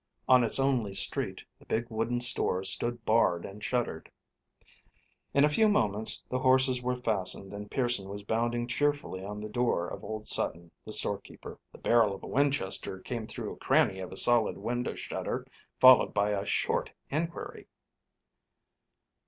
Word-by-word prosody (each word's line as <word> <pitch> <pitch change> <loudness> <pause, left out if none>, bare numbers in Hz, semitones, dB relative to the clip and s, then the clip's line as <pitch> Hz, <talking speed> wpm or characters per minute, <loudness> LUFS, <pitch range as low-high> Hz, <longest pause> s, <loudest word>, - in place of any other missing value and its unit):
On 125 -1 +6
its 115 - +2
only 125 -7 0
street - - 0 0.2
the - - -20
big 115 +2 -1
wooden 115 +2 -2
store 115 -6 +4
stood 120 +4 +1
barred 110 -6 +2
and 105 +2 -10
shuttered. 120 -10 -3 1.2
In 140 +1 +4
a - - +4
few 215 +9 +3
moments 110 - +1
the 130 - -2
horses 130 -1 +3
were 125 0 -1
fastened 100 -4 -1
and 105 0 -8
Pearson 120 -7 -1
was 100 +1 -7
pounding 120 +3 -1
cheerfully 145 -6 -2
on 105 +1 -6
the 105 - -6
door 105 -6 -1
of - - -8
old 110 0 -6
Sutton, 85 0 +1
the 110 - -9
storekeeper. 100 -1 -2
The - - -14
barrel 115 -4 +2
of - - -14
a - - -7
Winchester 140 -9 0
came 115 +2 -6
through - - -6
a - - -14
cranny 95 - +1
of 95 - -7
a 95 - -7
solid 120 -3 +4
window 120 +1 -3
shutter - - -5 0.3
followed 130 -3 +6
by 105 0 +1
a 100 -1 -3
short - - -1 0.2
inquiry. 165 +4 -5
115 Hz, 160 wpm, -29 LUFS, 100-125 Hz, 1.2 s, On